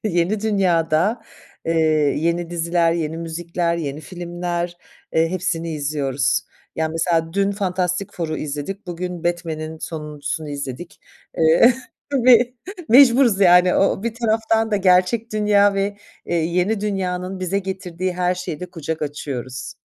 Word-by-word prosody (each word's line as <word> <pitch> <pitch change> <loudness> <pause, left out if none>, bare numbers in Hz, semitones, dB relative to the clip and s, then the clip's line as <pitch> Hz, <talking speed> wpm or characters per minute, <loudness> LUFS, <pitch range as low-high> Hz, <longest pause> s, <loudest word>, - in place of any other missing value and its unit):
yeni 190 +1 +1
dünyada, 190 0 +1 0.4
eee, 165 - 0 0.5
yeni 170 +2 -1
diziler, 170 0 +1
yeni 160 -1 -2
müzikler, 170 +1 -2
yeni 150 -3 -4
filmler, 175 0 -4 0.4
eee, 165 0 +3
hepsini 170 -2 -2
izliyoruz. 140 -2 0 0.3
Ya, 160 0 0
mesela 165 0 0
dün 200 +1 +1
Fantastic 185 -1 -1
Four'u 160 -3 -3
izledik, 150 +7 -5
bugün 175 0 -5
Batman'in 160 -2 -3
sonuncusunu 150 -1 -5
izledik. 140 +3 -6 0.4
Eee, 165 +10 +6 0.4
tabii. 245 -2 +4 0.3
Mecburuz 245 -4 +6
yani 180 -1 +6
o - - +3
o - - -4
bir 230 0 -2
taraftan 225 -1 +1
da 210 - +2
gerçek 195 +4 +2
dünya 205 -1 +3
ve, 200 +1 -1 0.3
eee, 175 - -2
yeni 180 +6 +1
dünyanın 185 -2 -3
bize 185 +2 0
getirdiği 185 -1 -4
her 180 0 +1
şeye 180 -3 -6
de 180 -1 -7
kucak 160 -2 -4
açıyoruz. 130 -4 -5
175 Hz, 135 wpm, -21 LUFS, 160-195 Hz, 0.5 s, Eee